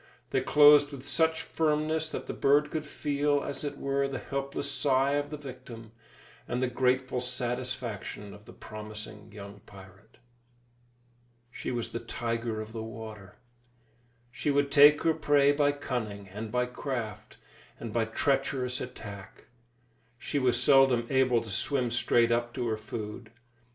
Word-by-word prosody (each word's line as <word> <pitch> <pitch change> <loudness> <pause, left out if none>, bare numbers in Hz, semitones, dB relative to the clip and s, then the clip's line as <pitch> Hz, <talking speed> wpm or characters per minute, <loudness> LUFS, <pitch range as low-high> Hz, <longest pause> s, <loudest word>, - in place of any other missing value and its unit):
They 135 - +2
closed 145 +1 +6
with 140 0 -9
such 160 +1 +1
firmness 155 0 0
that - - -5
the - - -5
bird 145 +2 +3
could 155 -1 -3
feel, 145 0 0
as 140 - -5
it 145 - -4
were, 140 0 0
the 135 -1 -4
helpless 140 +1 -3
sigh 135 0 +2
of 145 0 0
the 150 - -5
victim, 125 -5 -10 0.6
and 120 - -2
the 130 - +1
grateful 125 0 +1
satisfaction 125 -4 -4
of 105 0 -14
the - - -12
promising 105 0 -9
young 100 0 -10
pirate. 100 +3 -15 1.3
She - - -5
was 120 -2 -3
the 115 - -3
tiger 115 -2 -3
of 110 0 -9
the 115 - -4
water. 110 -2 -9 1.0
She 145 - -2
would 140 0 +2
take 145 +1 +7
her 165 - +4
prey 145 -2 +4
by 145 0 +3
cunning 110 -8 -4
and 105 +3 -6
by 125 0 +1
craft, 125 -4 -5 0.4
and 115 -2 -6
by 115 -1 +1
treacherous 130 +1 0
attack. 100 -6 -9 0.7
She 145 - -2
was 130 -2 +3
seldom 135 -4 +5
able 130 -3 +3
to 110 -2 -8
swim 125 +4 0
straight 120 -1 +3
up 120 0 0
to 125 -3 -2
her 110 - -1
food. 110 +1 -7
125 Hz, 150 wpm, -29 LUFS, 115-140 Hz, 1.3 s, take